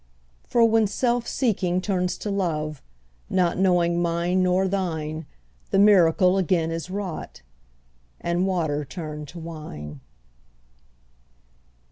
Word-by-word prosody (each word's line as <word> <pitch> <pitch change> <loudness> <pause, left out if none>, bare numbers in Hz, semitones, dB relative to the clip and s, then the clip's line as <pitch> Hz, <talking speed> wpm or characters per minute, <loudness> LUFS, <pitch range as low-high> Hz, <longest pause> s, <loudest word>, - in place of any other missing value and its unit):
For 235 -1 +4
when 225 -1 +3
self 240 +3 0
seeking 190 -8 0
turns 180 -2 -1
to 210 - -4
love, 155 -6 -2 0.5
Not 180 -2 +1
knowing 175 -2 +3
mine 170 +2 +1
nor 185 +1 +2
thine, 160 -5 -3 0.4
The - - +1
miracle 185 -2 +5
again 165 -2 +1
is 165 +2 -4
wrought, 185 - -5 0.8
And 175 +2 0
water 160 -6 0
turned 150 -1 -7
to 175 - -11
wine. 150 - -8
180 Hz, 110 wpm, -24 LUFS, 160-190 Hz, 0.8 s, miracle